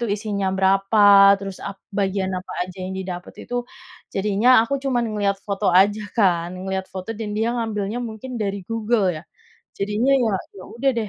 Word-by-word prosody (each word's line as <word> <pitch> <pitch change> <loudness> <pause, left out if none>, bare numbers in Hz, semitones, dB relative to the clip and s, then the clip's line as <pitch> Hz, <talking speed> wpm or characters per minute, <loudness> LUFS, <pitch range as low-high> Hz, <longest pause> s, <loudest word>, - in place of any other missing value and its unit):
itu - - 0
isinya 205 -1 -1
berapa, 195 +1 +6
terus 195 -1 -7
ap 195 - -6 0.2
bagian 195 -1 -1
apa 185 0 -5
aja 185 -1 -12
yang 190 - -5
didapat 180 -2 -6
itu. 245 - -7 0.6
Jadinya 205 +4 +1 0.2
aku 280 +4 -2
cuman 245 -3 +1
ngelihat 200 -1 0
foto 200 0 0
aja, 195 +4 +4 0.2
kan. 175 -6 +2
Ngelihat 190 0 -4
foto 190 +4 -5
dan 220 -2 -4
dia 225 +2 0
ngambilnya 220 -2 -2
mungkin 220 +4 -9
dari 200 -2 -3
Google 225 -2 +1
ya? - - -17 0.6
Jadinya, 210 +7 +1
ya 220 - +1 0.2
ya 185 - -10
udah 270 +3 +1
deh, 220 -2 -1
200 Hz, 175 wpm, -22 LUFS, 190-220 Hz, 0.6 s, berapa